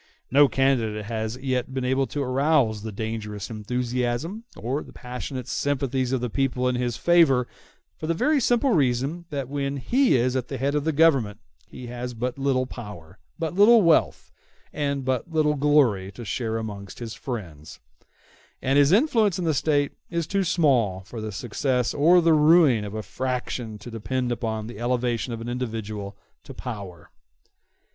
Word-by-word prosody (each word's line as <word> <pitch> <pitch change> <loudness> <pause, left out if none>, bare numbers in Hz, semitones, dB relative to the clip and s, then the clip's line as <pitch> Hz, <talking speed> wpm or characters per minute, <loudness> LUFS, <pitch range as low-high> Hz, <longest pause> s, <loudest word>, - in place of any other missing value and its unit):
No 145 +2 +6
candidate 120 -6 0
has 110 +1 -3
as 130 - -15
yet 130 0 -2
been 130 -1 -1
able 130 +1 +1
to 145 - -3
arouse 130 -4 +2
the 110 +1 -5
dangerous 105 -1 -5
enthusiasm 125 - -2
or 130 +6 -2
the - - -12
passionate 125 0 -6
sympathies 135 -2 -1
of 130 -2 0
the 125 - -1
people 125 -1 0
in 125 - +1
his 120 -1 -2
favor, 150 -6 +4 0.5
for 155 - -4
the 165 - +1
very 300 - +2
simple 245 +2 +2
reason 140 - +1
that 140 -4 -3
when 140 0 -2
he 250 - +2
is 125 +1 +1
at 130 -2 -1
the 135 - -5
head 140 +3 0
of 150 0 -1
the 160 - +2
Government 135 -10 +3 0.3
he 125 - -10
has 120 0 -6
but 125 +3 -3
little 135 -2 +1
power, 100 -8 -10 0.2
but 165 -1 -3
little 210 +3 +6
wealth, 165 -2 +2 0.4
and 140 -2 -2
but 130 +6 -1
little 155 -2 +2
glory 135 -10 +2
to 120 +3 -9
share 110 +2 -2
amongst 100 -3 -7
his 115 -2 -6
friends; 85 - -7 0.8
and 135 +2 +2
his 145 +1 +5
influence 220 - +3
in 180 - -2
the 160 - +2
State 145 0 +1 0.2
is 170 -1 -1
too 195 +4 0
small 130 - +2
for 110 +4 -8
the 110 0 -4
success 125 +4 -1
or 170 +5 +5
the 165 -1 +4
ruin 150 -6 +5
of 105 +1 -6
a 110 - -4
faction 125 0 -4
to 105 +4 -10
depend 120 +3 -2
upon 110 -2 -3
the 115 -1 -9
elevation 120 0 -1
of 115 -1 -5
an 115 - -6
individual 110 -5 -4 0.3
to - - -11
power. 100 -9 -8
125 Hz, 175 wpm, -25 LUFS, 115-145 Hz, 0.8 s, No